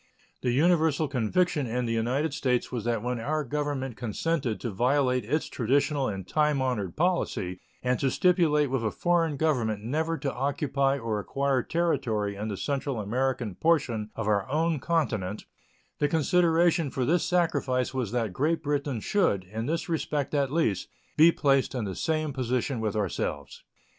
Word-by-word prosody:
The 125 - 0
universal 155 +2 +3
conviction 140 +3 0
in 125 +2 -1
the 115 - -1
United 130 +7 0
States 130 -5 0
was 120 -4 -4
that 115 -2 0
when 125 -1 -2
our 150 +6 -1
Government 140 -2 -3
consented 120 +3 -2
to 120 - -3
violate 125 +3 +2
its 145 +9 -1
traditional 140 +3 +1
and 95 -3 -5
time 150 +1 +2
honored 120 -9 -1
policy 155 - 0 0.2
and 125 0 +1
to 135 - +2
stipulate 155 -4 +3
with 135 -3 0
a 110 - +1
foreign 165 - +1
government 120 -9 0
never 160 +7 -1
to 140 -2 -3
occupy 140 +1 0
or 115 -4 -2
acquire 135 +4 0
territory 115 -11 0
in 105 +2 -4
the 100 -3 -4
Central 135 +4 -2
American 120 +1 -1
portion 120 - +1
of 115 - -3
our 100 0 +1
own 160 +2 +1
continent, 110 - -1 0.5
the 145 - +3
consideration 165 0 +3
for 130 -1 -1
this 170 +5 +2
sacrifice 140 -8 +1
was 125 -6 -2
that 115 -5 -1
Great 155 - 0
Britain 140 -5 -1
should, 175 - +1
in 110 +5 -5
this 165 +2 -1
respect 150 -4 -2
at 140 -2 +1
least, 130 - 0 0.3
be 160 +2 +7
placed 135 -4 +1
in 120 -4 -2
the 95 - -4
same 155 - -1
position 130 0 -1
with 110 -2 -2
ourselves. 80 -8 -3
135 Hz, 165 wpm, -27 LUFS, 115-155 Hz, 0.5 s, be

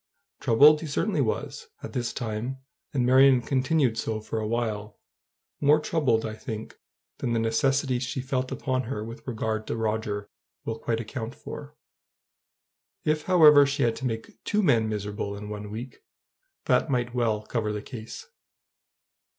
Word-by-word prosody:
Troubled 150 +6 +6
he 160 - -5
certainly 180 +9 0
was, 460 - -2 0.2
at - - -7
this 120 -3 -1
time; 120 +3 -4 0.3
and 130 -4 +1
Marion 130 +1 +6
continued 130 0 +1
so 110 -1 -2
for 110 +1 -4
a 110 - -2
while, 110 -2 -2 0.6
more 150 +1 +5
troubled, 135 -9 +1
I 110 - -3
think, 110 0 -7 0.4
than 120 - -1
the 115 - +2
necessity 130 +3 +1
she 130 +1 -3
felt 130 0 -2
upon 130 -2 -1
her 105 -5 -3
with 115 +3 -9
regard 110 -2 -2
to - - -2
Roger 110 -2 -2 0.4
will 115 0 -3
quite 115 0 -1
account 115 +1 -5
for. - - -9 1.3
If, 155 0 0
however, 150 -6 +7
she 140 0 0
had 115 -1 +2
to 130 - -5
make 115 -2 -6
two 210 0 +1
men 115 - +3
miserable 105 -1 -3
in 105 +1 -7
one 105 0 -6
week, 120 +4 -7 0.6
that - - +2
might 120 -2 0
well 115 -4 0
cover 110 -1 -2
the 105 -1 -4
case. 115 - -8
120 Hz, 160 wpm, -27 LUFS, 110-135 Hz, 1.3 s, however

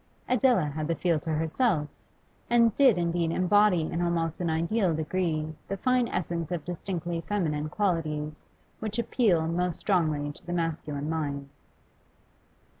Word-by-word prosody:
Adela 250 - +3
had 150 +1 -3
the 165 - 0
field 165 -2 +1
to - - -6
herself, 160 - +1 0.6
and 235 -2 +4
did 260 -8 +5
indeed 170 -1 0
embody 185 +1 +4
in 170 +2 -2
almost 165 -2 0
an 170 - 0
ideal 170 +3 +1
degree 155 -1 -1
the 195 - -3
fine 250 +3 +2
essence 170 -4 -2
of 170 -4 -3
distinctly 175 -1 -3
feminine 155 -7 -1
qualities 155 -5 -2 0.3
which 215 0 -3
appeal 215 -8 +2
most 175 +1 -1
strongly 155 -7 +1
to - - -16
the 175 - -5
masculine 155 -4 -2
mind. 145 -3 -3
170 Hz, 140 wpm, -28 LUFS, 155-195 Hz, 0.6 s, did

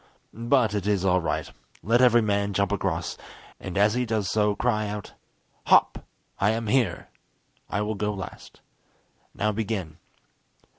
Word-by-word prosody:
But 115 -1 +1
it 100 -1 -2
is 100 -2 +1
all 90 -1 +3
right. 85 - -2 0.3
Let 115 +4 +3
every 120 -2 +5
man 100 -1 0
jump 100 0 +1
across, 90 -5 -2 0.4
and 95 0 -6
as 105 +2 +4
he 125 +1 0
does 110 -5 -1
so 105 -1 +2
cry 110 -1 0
out 105 -1 -6 0.5
'Hop! - - +4 0.4
I 100 - +3
am 115 +1 -1
here.' 105 -5 0 0.6
I 105 - -1
will 105 +1 -2
go 105 0 -2
last. 95 -3 -9 0.7
Now 105 +1 0
begin." 100 -7 -3
105 Hz, 150 wpm, -25 LUFS, 100-110 Hz, 0.7 s, every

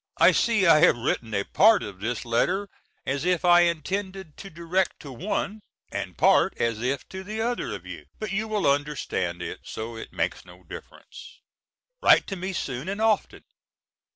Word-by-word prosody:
I - - +7
see 225 -5 +2
I 160 -3 +7
have 160 -6 +5
written 115 -1 -2
a 100 - +1
part 220 - +4
of 100 -2 -8
this 110 +3 -3
letter 180 +13 0 0.4
as 135 +2 -2
if 180 0 +1
I 175 0 +7
intended 185 +1 -1
to 195 - -9
direct 170 +2 -1
to 140 - -9
one, 200 - -3 0.3
and - - -5
part - - +4
as 115 -1 -1
if 130 +2 -2
to 190 0 -7
the 215 +3 -6
other 240 +2 -2
of 95 -2 -10
you; 85 -5 -9
but 215 -3 -5
you 215 +3 -1
will 215 -2 -1
understand 140 -12 -1
it, - - -6
so 115 +1 -6
it - - -9
makes - - -2
no - - -16
difference. - - -12 0.6
Write - - +6
to 195 - -5
me 190 +1 -4
soon 140 -3 -4
and 200 +2 -4
often. 220 -1 0
170 Hz, 180 wpm, -25 LUFS, 120-195 Hz, 0.6 s, I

